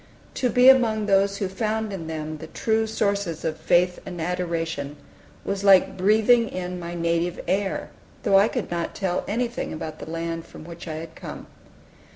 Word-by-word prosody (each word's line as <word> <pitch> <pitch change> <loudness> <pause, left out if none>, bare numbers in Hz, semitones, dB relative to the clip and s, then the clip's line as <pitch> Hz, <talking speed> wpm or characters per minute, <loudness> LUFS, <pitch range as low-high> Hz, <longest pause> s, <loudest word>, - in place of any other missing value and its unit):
To 250 - 0
be 250 +1 +5
among 230 -5 +5
those 200 0 +3
who 200 - -1
found 215 +2 -2
in 165 -4 -5
the 155 0 -5
true 220 +6 0
sources 200 -7 -1
of 160 -1 -1
faith 180 +2 +2
and 180 -2 -7
adoration, 165 -4 -2 0.5
was 195 0 -2
like 190 -1 +6
breathing 220 +5 +4
in 180 0 -4
my 170 0 -6
native 170 +1 0
air, 195 +2 -1 0.3
though 200 -5 +5
I 205 - +5
could 240 -5 -4
not 170 -1 -2
tell 185 -2 -1
anything 235 +3 -2
about 155 0 -6
the - - -8
land 165 0 -4
from - - -11
which 170 +1 -10
I 155 - -4
had 160 +1 -7
come. - - -8
180 Hz, 175 wpm, -24 LUFS, 165-210 Hz, 0.5 s, like